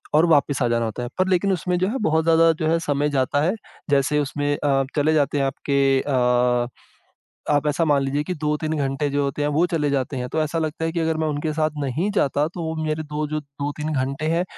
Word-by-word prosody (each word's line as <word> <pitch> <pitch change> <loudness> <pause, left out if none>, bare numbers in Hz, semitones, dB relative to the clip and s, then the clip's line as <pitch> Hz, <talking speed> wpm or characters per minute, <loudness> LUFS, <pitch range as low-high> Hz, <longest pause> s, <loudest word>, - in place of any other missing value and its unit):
और 160 - +5
वापिस 145 -3 +3
आ - - +2
जाना 115 0 +1
होता 115 +2 -4
है। 120 - -4
पर 185 - +2
लेकिन, 190 +2 +2
उसमें 180 +1 -1
जो 185 - +1
है, 240 - -2
बहुत 160 -5 +2
ज़्यादा 165 0 +5
जो 155 - +1
है, 165 +1 +3
समय 145 0 +1
जाता 140 +1 +1
है। 175 +7 +2 0.4
जैसे 140 +1 +2
उसमें 145 0 -1
अ, 135 -2 +1
चले 155 +1 +2
जाते 145 -1 +1
हैं 135 - +2
आपके 140 +1 -1 0.2
अ, 125 -2 +2 0.8
आप 145 0 +2
ऐसा 150 +3 +1
मान 145 -3 +2
लीजिए 140 +2 -1
कि 180 - -3
2-3 150 +1 -1
घंटे 140 +1 -1
जो 145 +1 0
होते 140 +1 -2
हैं, 145 - +1
वो 150 +4 +2
चले 160 -4 -1
जाते 135 0 -1
हैं। 125 0 -3
तो 160 - -1
ऐसा 155 +2 -2
लगता 160 0 -2
है 165 - -1
कि 170 - -1
अगर 160 0 0
मैं 160 0 -1
उनके 150 +1 -2
साथ 155 0 0
नहीं 150 +9 -1
जाता, 145 -4 +1
तो 170 0 -7
वो 160 0 -3
मेरे 155 0 -2
2, 150 0 -3
जो 155 0 -2
2-3 145 +2 -5
घंटे 135 +2 -2
हैं, 175 - +1
150 Hz, 245 wpm, -22 LUFS, 140-160 Hz, 0.8 s, और